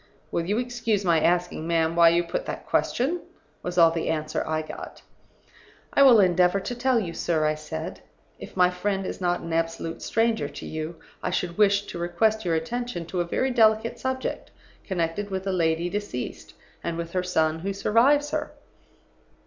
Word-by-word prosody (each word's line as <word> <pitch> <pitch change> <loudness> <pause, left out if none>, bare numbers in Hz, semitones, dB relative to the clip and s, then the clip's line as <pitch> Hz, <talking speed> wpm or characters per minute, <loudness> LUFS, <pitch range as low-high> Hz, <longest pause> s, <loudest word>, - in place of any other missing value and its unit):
"'Will 170 - -1
you 205 +3 +1
excuse 230 -4 -1
my 170 -2 +4
asking, 175 -1 +1
ma'am, 165 -1 +1
why 170 -1 +7
you 170 +1 +2
put - - -4
that - - -5
question?' 305 +9 0 0.4
was 180 0 -5
all 165 -1 +7
the 165 -1 -2
answer 155 -1 -1
I 155 0 -1
got. - - -9 0.9
"'I - - +4
will 255 -5 +8
endeavor 180 0 +4
to 245 - -4
tell 245 0 +2
you, 175 -6 -4
sir,' 160 -2 0
I 155 - +2
said. 155 - -6 0.4
'If - - -10
my 180 0 +5
friend 195 +1 -2
is - - -5
not 175 -1 0
an 165 - -5
absolute 165 0 -2
stranger 225 0 +1
to - - -9
you, 155 +1 -5 0.3
I - - -1
should 180 -1 -2
wish 205 -1 +3
to - - -7
request 215 +5 +1
your 170 -2 +1
attention 225 +2 -3
to 175 +2 -2
a - - -1
very 260 +9 0
delicate 220 -1 +3
subject, 260 0 -3 0.4
connected 185 +2 -2
with 190 0 -3
a 195 - 0
lady 165 -1 +1
deceased, 195 -10 -5 0.3
and 170 -1 -3
with 170 0 -5
her 185 - 0
son 160 -3 +1
who 195 +4 -3
survives 255 +9 +3
her. - - -3
180 Hz, 185 wpm, -25 LUFS, 165-220 Hz, 0.9 s, will